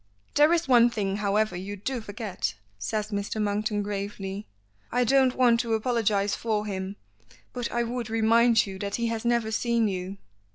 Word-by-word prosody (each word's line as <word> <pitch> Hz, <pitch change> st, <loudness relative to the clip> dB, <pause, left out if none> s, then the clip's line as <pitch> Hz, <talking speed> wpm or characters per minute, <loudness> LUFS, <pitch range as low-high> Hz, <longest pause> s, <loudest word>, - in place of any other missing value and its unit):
"There 300 Hz, +2 st, +5 dB
is 340 Hz, -2 st, +2 dB
one 240 Hz, -2 st, +6 dB
thing, 200 Hz, -4 st, -2 dB
however, 210 Hz, 0 st, +1 dB
you 195 Hz, +3 st, -5 dB
do 240 Hz, +5 st, -3 dB
forget," 205 Hz, -, -4 dB, 0.2 s
says 210 Hz, -, -2 dB
Mr. 205 Hz, +1 st, -3 dB
Monkton 210 Hz, 0 st, 0 dB
gravely. 200 Hz, 0 st, -5 dB, 0.4 s
"I 250 Hz, +1 st, +2 dB
don't 260 Hz, +1 st, +3 dB
want 240 Hz, -2 st, +4 dB
to 230 Hz, -1 st, 0 dB
apologize 215 Hz, -4 st, +1 dB
for 215 Hz, -2 st, -1 dB
him, 190 Hz, -1 st, -4 dB, 0.6 s
but 245 Hz, -2 st, -3 dB
I 240 Hz, 0 st, +1 dB
would 240 Hz, -1 st, -4 dB
remind 225 Hz, +1 st, +4 dB
you 190 Hz, -1 st, -7 dB
that 200 Hz, 0 st, -2 dB
he 235 Hz, -1 st, -1 dB
has 230 Hz, 0 st, -3 dB
never 235 Hz, -2 st, +1 dB
seen 235 Hz, 0 st, +1 dB
you." 190 Hz, 0 st, -4 dB
220 Hz, 170 wpm, -27 LUFS, 200-235 Hz, 0.6 s, one